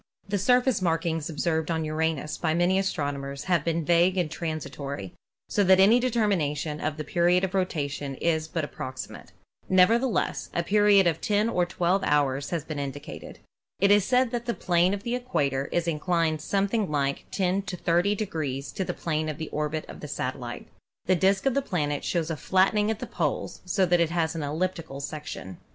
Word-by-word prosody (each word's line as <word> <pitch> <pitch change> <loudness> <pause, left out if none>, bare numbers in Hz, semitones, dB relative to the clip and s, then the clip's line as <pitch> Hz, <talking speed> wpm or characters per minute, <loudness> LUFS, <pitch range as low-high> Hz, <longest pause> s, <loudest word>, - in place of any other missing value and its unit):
The 200 0 -1
surface 250 +1 +3
markings 165 -1 0
observed 160 0 -1
on 160 -1 0
Uranus 155 -1 -1
by 160 -1 0
many 180 +2 +3
astronomers 140 -6 -3
have 175 -5 +1
been 165 -1 -1
vague 175 +3 +3
and 170 -4 0
transitory, 145 - -5 0.3
so 205 - +1
that 190 0 +6
any 215 +6 +6
determination 175 - 0
of 155 0 -2
the 155 - -3
period 175 +4 +2
of 190 0 -1
rotation 145 -7 -2
is 160 +1 0
but 160 -1 -2
approxi 130 -2 -6
mate. - - -12 0.4
Nevertheless, 225 +7 +2
a 170 - +1
period 205 +1 +5
of 170 -2 +1
10 210 +2 +1
or 180 -5 +1
12 180 +2 +1
hours 140 -3 +1
has 170 -4 -2
been 155 -2 -5
indicated. 140 +1 -7 0.4
It 200 +1 +4
is 205 -1 +6
stated 250 +2 +2
that 240 0 -3
the 235 - 0
plane 175 +2 +2
of 200 - -9
the 235 - -2
equator 140 - -1
is 175 -1 0
inclined 165 -1 0
something 200 +3 0
like 140 -2 -1
10 190 0 0
to 190 -2 -6
30 175 +5 +2
degrees 150 -9 -3
to 190 - -2
the - - -4
plane 155 -1 -2
of 150 - -4
the 160 - -5
orbit 150 +1 -2
of - - -10
the - - -7
satellite. - - -5 0.4
The 185 - +3
disk 195 +4 +2
of 270 - +3
the 280 - +1
planet 150 - -2
shows 165 -2 -1
a - - -1
flat 190 +5 +2
tening 210 0 +1
at 220 - -1
the - - -5
poles, - - -3
so 190 +1 +2
that 175 0 +3
it 170 -2 +2
has 165 -1 0
an 165 - -4
elliptical 160 -1 -3
section. 140 - -6
170 Hz, 195 wpm, -26 LUFS, 150-195 Hz, 0.4 s, that